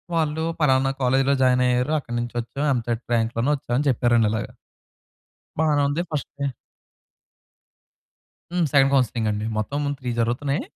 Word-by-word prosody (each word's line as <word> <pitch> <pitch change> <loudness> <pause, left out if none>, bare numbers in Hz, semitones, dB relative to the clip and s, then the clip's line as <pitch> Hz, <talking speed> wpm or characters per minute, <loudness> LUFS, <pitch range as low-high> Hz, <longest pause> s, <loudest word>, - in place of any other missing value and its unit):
వాళ్ళు, 160 -1 0 0.2
"పలానా 135 -2 +3
కాలేజీలో 135 +2 +3
జాయిన్ 125 0 +4
అయ్యారు 125 +4 +1
అక్కడి 120 -3 -7
నుంచి 120 0 -4
వచ్చాం 135 +5 -4
ఎంసెట్ 120 -1 -2
ర్యాంక్‌లోనే 115 +3 +1
వచ్చామని" 135 +2 -2
చెప్పారండి 120 -3 +3
అలాగా... 110 - -3 1.1
బానే 150 -2 +2
ఉంది. 145 +4 -1
ఫస్ట్ 150 -2 -3
డే 140 - 0 2.0
హ్మ్. 175 -2 +1
సెకండ్ 135 -1 +5
కౌన్సెలింగ్ 120 -4 +1
అండి. 105 +1 -2
మొత్తం 140 +7 -2 0.2
త్రీ 125 -3 -4
జరుగుతున్నాయి. 125 +5 0
130 Hz, 135 wpm, -23 LUFS, 120-145 Hz, 2.0 s, సెకండ్